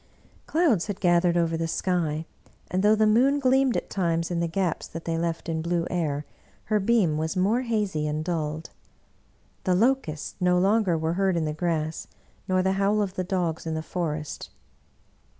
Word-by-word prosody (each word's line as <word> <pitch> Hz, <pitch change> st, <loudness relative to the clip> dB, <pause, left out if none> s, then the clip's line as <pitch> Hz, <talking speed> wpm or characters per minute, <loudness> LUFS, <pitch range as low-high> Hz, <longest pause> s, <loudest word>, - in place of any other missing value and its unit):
Clouds 305 Hz, -, +2 dB
had 205 Hz, -2 st, -4 dB
gathered 175 Hz, -1 st, +3 dB
over 165 Hz, -1 st, +1 dB
the 165 Hz, 0 st, -1 dB
sky, 165 Hz, -3 st, -1 dB, 0.5 s
and 185 Hz, -, +1 dB
though 210 Hz, +2 st, +5 dB
the 215 Hz, 0 st, +3 dB
moon 255 Hz, +7 st, +4 dB
gleamed 265 Hz, -1 st, +3 dB
at -, -, -3 dB
times 170 Hz, -3 st, -1 dB
in 170 Hz, -, 0 dB
the 170 Hz, -, 0 dB
gaps 175 Hz, 0 st, -1 dB
that 165 Hz, 0 st, -8 dB
they 165 Hz, -, -1 dB
left 165 Hz, 0 st, -2 dB
in 160 Hz, -1 st, -1 dB
blue 170 Hz, 0 st, 0 dB
air, 150 Hz, -4 st, -1 dB, 0.4 s
her 215 Hz, 0 st, +1 dB
beam 195 Hz, -7 st, +2 dB
was 160 Hz, +4 st, -2 dB
more 210 Hz, +7 st, +2 dB
hazy 210 Hz, -10 st, -1 dB
and 155 Hz, +1 st, -2 dB
dulled. 160 Hz, -2 st, -3 dB, 0.9 s
The 185 Hz, -2 st, +2 dB
locusts 205 Hz, -, 0 dB
no 180 Hz, 0 st, +3 dB
longer 195 Hz, -1 st, +3 dB
were 160 Hz, +1 st, -1 dB
heard 190 Hz, -1 st, +1 dB
in 160 Hz, -, 0 dB
the 155 Hz, -, -2 dB
grass, 160 Hz, -1 st, -2 dB, 0.4 s
nor 185 Hz, -1 st, +2 dB
the 190 Hz, -, +2 dB
howl 205 Hz, +2 st, +2 dB
of 200 Hz, -3 st, -1 dB
the 185 Hz, -, -2 dB
dogs 175 Hz, -4 st, -2 dB
in 160 Hz, -, -2 dB
the 160 Hz, -, -3 dB
forest. 155 Hz, -3 st, -4 dB
175 Hz, 185 wpm, -26 LUFS, 160-200 Hz, 0.9 s, though